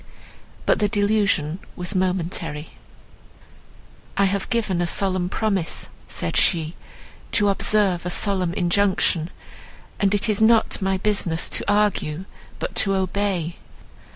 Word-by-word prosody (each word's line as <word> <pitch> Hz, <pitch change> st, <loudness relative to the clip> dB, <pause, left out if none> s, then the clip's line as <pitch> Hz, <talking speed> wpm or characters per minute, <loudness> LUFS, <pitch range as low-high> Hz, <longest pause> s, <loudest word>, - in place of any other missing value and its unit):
But -, -, +3 dB
the 210 Hz, -, +2 dB
delusion 200 Hz, -6 st, +1 dB, 0.2 s
was 180 Hz, +2 st, -3 dB
momentary. 175 Hz, -4 st, -2 dB, 1.5 s
"I 200 Hz, -, +4 dB
have 195 Hz, 0 st, -1 dB
given 210 Hz, -7 st, 0 dB
a 175 Hz, -, 0 dB
solemn 185 Hz, 0 st, +1 dB
promise," 195 Hz, -5 st, -1 dB, 0.2 s
said -, -, -4 dB
she, 165 Hz, -2 st, +2 dB, 0.6 s
"to 205 Hz, -2 st, +4 dB
observe 195 Hz, -2 st, +2 dB
a 180 Hz, -, -3 dB
solemn 185 Hz, -1 st, +1 dB
injunction, 180 Hz, -2 st, +1 dB, 0.7 s
and 200 Hz, 0 st, +2 dB
it 205 Hz, -, +1 dB
is 215 Hz, -1 st, +1 dB
not 225 Hz, -1 st, +4 dB
my 190 Hz, 0 st, +1 dB
business 185 Hz, -5 st, 0 dB
to -, -, 0 dB
argue, 195 Hz, -5 st, +1 dB, 0.3 s
but -, -, -4 dB
to 195 Hz, -1 st, +4 dB
obey. 190 Hz, -3 st, -1 dB
190 Hz, 125 wpm, -23 LUFS, 175-205 Hz, 1.5 s, I